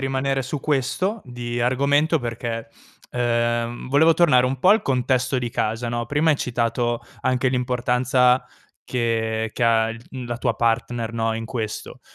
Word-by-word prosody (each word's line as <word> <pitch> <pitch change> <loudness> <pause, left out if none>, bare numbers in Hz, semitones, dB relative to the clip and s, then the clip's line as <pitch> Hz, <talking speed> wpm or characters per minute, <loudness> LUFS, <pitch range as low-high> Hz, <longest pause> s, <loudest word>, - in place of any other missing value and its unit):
rimanere 135 0 0
su 135 +3 -4
questo 150 - -1
di 120 -1 -5
argomento 140 +6 +2
perché, 115 -2 -4 0.4
uhm, 120 0 -1
volevo 160 +5 +5
tornare 140 -8 +4
un 130 0 -2
po' 185 - +4
al 220 - +5
contesto 130 0 +1
di 120 -1 -2
casa, 110 +2 -2
no, 120 0 -2
prima 150 +4 +2
hai 145 - +3
citato 120 -1 -1 0.2
anche 130 0 +1
l'importanza 125 0 +2 0.4
che 110 -2 -1
che 120 - -4
ha 115 -1 +3
il 115 +2 -9
mhmm, 130 -2 -6
la 120 -1 -3
tua - - 0
partner, 115 0 0
no, 115 -1 -1
in 115 0 -4
questo. 110 -2 -5
125 Hz, 160 wpm, -23 LUFS, 115-135 Hz, 0.4 s, volevo